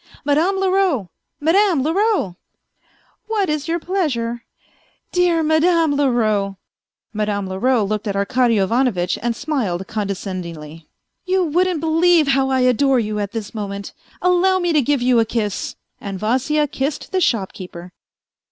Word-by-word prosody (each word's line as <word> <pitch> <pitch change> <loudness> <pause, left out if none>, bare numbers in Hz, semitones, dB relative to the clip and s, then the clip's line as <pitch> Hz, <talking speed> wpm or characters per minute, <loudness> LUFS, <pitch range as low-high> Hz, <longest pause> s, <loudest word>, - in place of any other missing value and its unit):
Madame 315 +7 +2
Leroux, 375 - +1 0.3
Madame 335 -1 +3
Leroux! 365 - +1 0.3
" - - -41
" - - -39
What 410 -6 0
is 300 0 -2
your 335 +1 0
pleasure? 260 -11 -2 0.2
" - - -36
" - - -44
Dear 350 -2 +2
Madame 320 0 +3
Leroux." 215 -8 +1 0.6
Madame 210 -2 -1
Leroux 220 +5 +1
looked 215 +2 -2
at 200 - -2
Arkady 230 +4 +2
Ivanovitch 195 -3 +1
and 235 -1 -1
smiled 230 - -2
condescendingly. 180 -7 -5 0.2
" - - -55
You 375 0 +2
wouldn't 350 0 +1
believe 325 -1 +3
how 270 0 +2
I 260 -1 +2
adore 255 +1 +3
you 215 -2 -2
at 205 -1 -3
this 225 -2 -6
moment.... 200 -2 -5 0.3
Allow 360 +1 +3
me 350 -2 0
to 300 - +4
give 275 -1 0
you 250 -1 +4
a - - +5
kiss. 215 -3 -3
..." - - -49
And 195 -1 -5
Vasya 265 +9 +1
kissed 275 +2 -3
the 375 0 0
shopkeeper. 185 - -2
255 Hz, 155 wpm, -20 LUFS, 205-330 Hz, 0.6 s, a